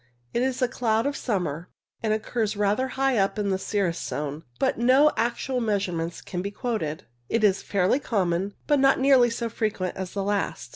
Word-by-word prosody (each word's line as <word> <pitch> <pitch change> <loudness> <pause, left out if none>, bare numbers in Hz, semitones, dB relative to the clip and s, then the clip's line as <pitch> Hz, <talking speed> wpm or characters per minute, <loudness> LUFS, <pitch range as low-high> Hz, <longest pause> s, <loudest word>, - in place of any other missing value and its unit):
It 235 - +1
is 255 0 0
a - - +4
cloud 225 -2 0
of 285 0 -1
summer, 180 - -2 0.3
and 220 - 0
occurs 215 0 -1
rather 210 +5 +1
high 270 -4 +2
up 195 +2 +1
in 205 -2 0
the 190 - 0
cirrus 190 -4 -1
zone, 145 +1 -4 0.2
but - - 0
no 265 +5 +5
actual 240 +2 -1
measurements 180 -6 -2
can 180 - -4
be 200 - -3
quoted. 205 - -3 0.3
It 230 -1 +1
is 195 -2 +4
fairly 195 +6 +1
common, 195 -5 -1
but 290 -2 +3
not 270 0 +4
nearly 265 -3 +5
so 230 0 -2
frequent 215 -5 -2
as 185 -1 -5
the 200 - -2
last. 200 -10 -2
210 Hz, 190 wpm, -25 LUFS, 190-245 Hz, 0.3 s, no